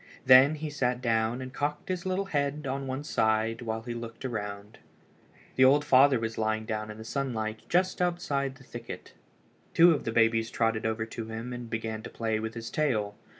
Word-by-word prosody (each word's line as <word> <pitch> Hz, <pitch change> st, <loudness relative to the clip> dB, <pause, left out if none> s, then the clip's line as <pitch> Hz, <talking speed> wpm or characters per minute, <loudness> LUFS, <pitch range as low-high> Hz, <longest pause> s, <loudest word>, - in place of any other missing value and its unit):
Then 130 Hz, +4 st, +8 dB
he 155 Hz, 0 st, -5 dB
sat 125 Hz, -4 st, 0 dB
down 115 Hz, +1 st, 0 dB
and 130 Hz, 0 st, -9 dB
cocked 145 Hz, +2 st, -3 dB
his 185 Hz, 0 st, -2 dB
little 190 Hz, +1 st, 0 dB
head 145 Hz, -3 st, -1 dB
on 135 Hz, 0 st, -3 dB
one 130 Hz, +2 st, -3 dB
side 110 Hz, -4 st, +1 dB
while 110 Hz, -1 st, -3 dB
he 120 Hz, 0 st, -5 dB
looked 115 Hz, +1 st, -7 dB
around. 105 Hz, -3 st, -5 dB, 0.8 s
The 130 Hz, -, +6 dB
old 145 Hz, +3 st, +5 dB
father 135 Hz, -1 st, +5 dB
was 115 Hz, 0 st, -4 dB
lying 110 Hz, 0 st, 0 dB
down 110 Hz, -1 st, -3 dB
in 105 Hz, -, -8 dB
the 110 Hz, -, -9 dB
sunlight 110 Hz, -5 st, -3 dB
just 180 Hz, +1 st, +1 dB
outside 145 Hz, -7 st, -1 dB
the 135 Hz, -, -17 dB
thicket. 120 Hz, -2 st, -9 dB, 0.6 s
Two 170 Hz, +1 st, +8 dB
of 155 Hz, -, 0 dB
the 115 Hz, -, -2 dB
babies 115 Hz, 0 st, +2 dB
trotted 115 Hz, -1 st, 0 dB
over 110 Hz, 0 st, -2 dB
to 115 Hz, 0 st, -7 dB
him 115 Hz, +2 st, -6 dB
and 120 Hz, -1 st, -7 dB
began 110 Hz, -1 st, -3 dB
to -, -, -8 dB
play 110 Hz, -1 st, -2 dB
with 110 Hz, +1 st, -5 dB
his 115 Hz, -1 st, -6 dB
tail. 110 Hz, -9 st, 0 dB
120 Hz, 195 wpm, -28 LUFS, 110-140 Hz, 0.8 s, Then